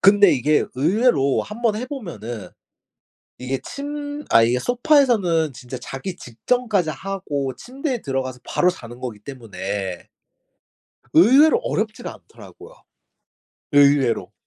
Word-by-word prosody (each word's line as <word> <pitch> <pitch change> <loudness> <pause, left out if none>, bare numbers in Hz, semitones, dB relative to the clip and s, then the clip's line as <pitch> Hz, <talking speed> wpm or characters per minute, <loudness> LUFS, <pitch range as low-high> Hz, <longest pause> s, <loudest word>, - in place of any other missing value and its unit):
근데 200 0 +6
이게 145 +4 +2
의외로 155 - +2
한번 215 0 -1
해 250 +4 -4
보면은 120 - -7 0.9
이게 130 +1 -3
침 290 +1 -6 0.2
아 115 - +6
이게 120 +2 +2
소파에서는 235 - +2
진짜 125 +1 -8
자기 155 +9 -6
직전까지 195 - -1
하고 145 -5 -4
침대에 265 0 -4
들어가서 130 -2 -3
바로 180 - +1
자는 120 -8 -10
거기 120 -5 -5
때문에 100 -6 -6 1.1
의외로 265 - +6
어렵지를 - - -3
않더라고요. - - -14 1.0
의외로. 140 -9 +3
155 Hz, 270 characters per minute, -22 LUFS, -, 1.1 s, 근데